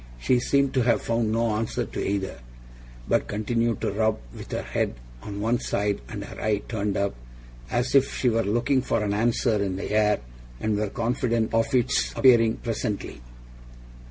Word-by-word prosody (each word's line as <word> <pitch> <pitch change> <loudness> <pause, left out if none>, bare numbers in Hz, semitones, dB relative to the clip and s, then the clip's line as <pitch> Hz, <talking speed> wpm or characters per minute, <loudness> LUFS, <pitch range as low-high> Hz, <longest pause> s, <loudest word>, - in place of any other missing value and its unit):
She 125 - +3
seemed 140 +2 +2
to 130 - +2
have 115 -3 +2
found 115 -1 0
no 115 0 +1
answer 110 +1 -1
to - - -4
either, 100 -7 -2 0.7
but - - +1
continued 115 +2 -1
to - - 0
rub, 110 +1 +1 0.2
with - - -9
her - - -2
head - - -1 0.3
on 100 +5 -6
one 115 +3 +1
side 100 -4 -1
and - - -5
her - - -9
eye 105 -1 0
turned 105 -3 -1
up, 100 0 0 0.6
as 120 +1 0
if 135 -1 +3
she 130 - +1
were 115 -1 +3
looking 120 +6 +1
for 110 - 0
an 100 -1 0
answer 115 0 +1
in 95 -2 -1
the 95 - -4
air 105 0 +3 0.4
and 110 - 0
were 105 0 -1
confident 115 0 0
of 115 +4 +2
its 120 -2 +2
appearing 115 -4 +5
presently. 110 - -4
115 Hz, 180 wpm, -25 LUFS, 105-120 Hz, 0.7 s, appearing